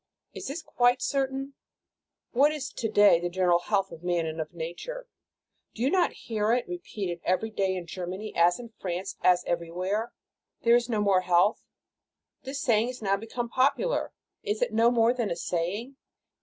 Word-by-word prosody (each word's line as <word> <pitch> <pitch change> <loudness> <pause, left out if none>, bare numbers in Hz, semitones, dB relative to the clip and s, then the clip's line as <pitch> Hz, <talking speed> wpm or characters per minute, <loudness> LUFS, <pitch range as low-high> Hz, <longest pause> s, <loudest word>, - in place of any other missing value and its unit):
Is - - -7
this 295 +5 -5
quite 245 +1 +2
certain? 270 0 -1 0.8
What 280 +5 +4
is 300 -3 -4
to 225 - -2
day 205 -5 +6
the 175 +1 -2
general 175 -1 +3
health 195 +1 0
of 165 -1 -10
man 175 -2 0
and 160 0 -3
of 155 -1 -6
nature? 175 - -6 0.7
Do 235 - -3
you 270 - +2
not 365 -2 +3
hear 220 0 +1
it 245 - 0
repeated 200 - -5
every 205 +5 0
day 195 -3 0
in 180 -2 -5
Germany 185 +5 -6
as 175 +3 +4
in 235 -2 -10
France, 180 0 -4
as 180 -1 +4
everywhere, 180 +6 -2 0.5
"There 235 0 +6
is 240 0 +1
no 215 -3 +1
more 195 -3 +3
health"? 180 +3 +3 0.8
This 275 +1 -5
saying, 235 +1 +2
now 195 -1 +2
become 230 +3 -4
popular, 280 - +1 0.3
is 430 +3 -1
it - - -2
no 230 +1 +5
more 235 0 +3
than 235 -5 -1
a - - -1
saying? 185 +10 -3
215 Hz, 175 wpm, -28 LUFS, 180-250 Hz, 0.8 s, day